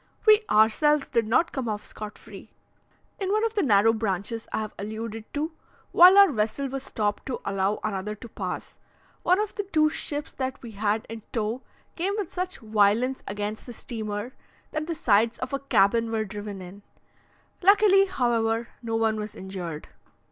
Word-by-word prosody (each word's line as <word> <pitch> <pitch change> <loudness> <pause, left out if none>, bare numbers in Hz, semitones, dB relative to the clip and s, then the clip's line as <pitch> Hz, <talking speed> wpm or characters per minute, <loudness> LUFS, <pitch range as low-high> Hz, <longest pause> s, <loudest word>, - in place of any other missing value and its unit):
We 430 0 +7
ourselves 270 +8 +4
did 230 -4 +1
not 255 +9 +2
come 255 -4 -3
off 210 -1 -4
scot 215 -1 -8
free. - - -12 0.7
In 385 -1 -1
one 430 +2 +2
of 450 - -1
the 420 - +1
narrow 225 - +4
branches 215 +1 -3
I - - -1
have 215 - -5
alluded 220 +1 -6
to, 305 +3 -1 0.4
while 365 +3 +8
our 400 -4 +8
vessel 225 +4 -1
was 270 +1 -4
stopped 210 -5 -2
to 260 - -3
allow 195 +1 0
another 210 0 -3
to 225 - -10
pass, 185 -5 -6 0.4
one 365 +2 +3
of 425 -1 -2
the - - -2
two 315 -6 +2
ships 295 -1 -4
that 260 0 -3
we 235 - -8
had 210 +1 -1
in 225 0 -7
tow 225 +2 -2 0.3
came 385 +4 -1
with 405 -5 -4
such 365 +1 -3
violence 220 +4 +2
against 205 +3 -4
the 245 - -7
steamer, 215 +1 -5 0.4
that 310 0 -3
the 335 - -2
sides 230 -6 +2
of 255 +1 -5
a 275 - 0
cabin 230 -3 +2
were 220 -1 -1
driven 205 -1 -7
in: 185 +3 -11 0.8
luckily, 390 0 +6
however, 235 -7 0
no 225 -1 -3
one 225 -1 +1
was 210 0 -5
injured. 180 -5 -6
225 Hz, 175 wpm, -26 LUFS, 210-295 Hz, 0.8 s, while